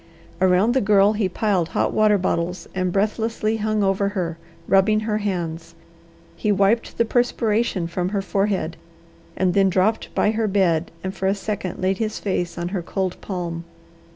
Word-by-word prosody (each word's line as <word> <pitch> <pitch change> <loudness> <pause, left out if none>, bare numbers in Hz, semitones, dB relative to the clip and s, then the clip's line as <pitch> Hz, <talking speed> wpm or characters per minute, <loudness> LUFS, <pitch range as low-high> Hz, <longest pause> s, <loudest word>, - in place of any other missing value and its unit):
Around 190 +5 +4
the 265 - +2
Girl 205 0 +4
he 205 -3 0
piled 185 -4 0
hot - - +1
water 215 -1 +4
bottles 180 -1 -2
and 185 -1 -1
breathlessly 220 +2 0
hung 215 -1 0
over 195 +1 +1
her, 165 -2 -2 0.3
rubbing 215 +3 +4
her 215 -1 -1
hands. 170 -4 -4 0.6
He 210 - 0
wiped 200 +4 +1
the 230 - +3
perspiration 225 -5 +1
from 175 +2 -2
her 200 -1 -2
forehead, 195 -4 -1 0.6
and 185 -1 +2
then 195 0 +4
dropped 190 +4 +1
by 210 - +3
her 220 0 0
bed 180 -5 +1
and 190 0 -3
for 190 - -2
a 195 - +2
second 200 -3 -4
laid 190 0 +1
his 215 -1 -2
face 180 -3 -2
on 175 0 -3
her 185 -1 -2
cold 185 +1 -3
palm. 175 -3 -4
195 Hz, 170 wpm, -22 LUFS, 180-215 Hz, 0.6 s, Around